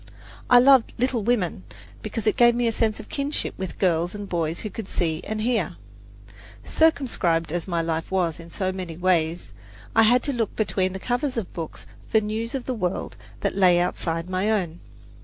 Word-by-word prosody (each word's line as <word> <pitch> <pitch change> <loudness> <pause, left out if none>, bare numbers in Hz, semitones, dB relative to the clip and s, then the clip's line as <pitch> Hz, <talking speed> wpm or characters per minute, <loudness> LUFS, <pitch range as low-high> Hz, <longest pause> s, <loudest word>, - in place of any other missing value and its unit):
I 245 - +8
loved 260 -1 +5
"Little 250 -1 0
Women" 205 - 0 0.4
because 215 +1 -4
it 215 - +3
gave 240 -1 +5
me 240 0 +1
a 230 - +2
sense 220 -1 0
of - - -9
kinship 285 +1 -2
with 190 -2 -6
girls 175 0 +1
and 205 -1 -6
boys 165 -2 -1
who 215 - -5
could 220 -4 -7
see 160 -1 -1
and 215 0 -3
hear. 235 0 0 0.9
Circumscribed 210 - +1
as 175 +1 -2
my 170 -2 0
life 165 0 -2
was 175 -4 0
in 165 0 -11
so 185 +2 -2
many 180 -4 -6
ways, 175 -2 0 0.4
I 225 - +7
had 240 +3 +4
to 285 - 0
look 230 -4 -2
between 190 -3 0
the 190 - -5
covers 250 +4 -1
of 215 -6 -4
books 165 -2 -6 0.2
for 220 - +3
news 220 +3 -3
of 260 - -4
the 260 - -2
world 185 -6 -3 0.3
that - - -1
lay 180 -3 +5
outside 165 -1 -1
my 185 +3 0
own. 175 -6 -1
195 Hz, 195 wpm, -24 LUFS, 175-230 Hz, 0.9 s, I